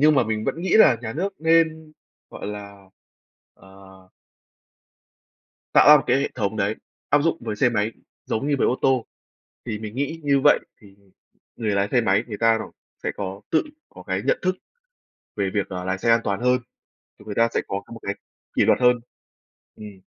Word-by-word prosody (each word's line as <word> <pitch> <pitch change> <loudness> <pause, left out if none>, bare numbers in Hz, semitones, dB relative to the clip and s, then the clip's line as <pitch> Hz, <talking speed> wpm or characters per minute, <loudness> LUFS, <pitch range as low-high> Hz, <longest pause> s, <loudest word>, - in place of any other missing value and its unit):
nhưng 150 +1 +6
mà 130 -4 +3
mình 110 0 -2
vẫn 165 - -2
nghĩ 185 - +1
là 135 - +7
nhà 115 -1 -4
nước 195 +6 -3
nên, 160 -1 +2 0.4
gọi - - -8
là, 100 -1 -8 0.7
ờ 95 0 -17 1.7
tạo - - +7
ra 150 - +11
một 140 - -1
cái - - +3
hệ 140 - -1
thống 105 0 -2
đấy, 105 +1 0 0.3
áp 145 - +3
dụng 165 +1 +1
với 110 -3 -4
xe 125 - +3
máy, 110 -1 -1 0.3
giống 125 +6 -2
như 145 - +2
với - - +2
ô 125 - 0
tô, 130 -3 +2 0.6
thì 110 -3 -4
mình 110 0 -7
nghĩ 145 +5 -3
như 140 -1 +3
vậy 145 - +6 0.2
thì 100 -2 -17 0.6
người 110 -2 -2
lái 100 0 +1
xe 125 - +3
máy 105 0 +2
người 105 -3 -6
ta 115 -1 +3
rồi - - -7 0.3
sẽ - - -1
có 95 0 -5
tự 160 - +3 0.3
có - - -13
cái - - -2
nhận - - +2
thức 185 0 0 0.8
về 100 -2 -1
việc 100 -2 -1
là 90 -1 -4
lái 95 0 -2
xe 115 - +1
an 115 0 +5
toàn 100 +1 -1
hơn, 125 +1 +2 0.6
thì - - -16
người 105 - -6
ta 115 +2 +3
sẽ - - +2
có 100 +1 -3
một 115 - -9
cái 100 - -3 0.4
kỷ - - +3
luật - - +4
hơn, 125 -1 +4 0.8
ừm. 105 -3 -11
115 Hz, 205 wpm, -23 LUFS, 100-140 Hz, 1.7 s, ra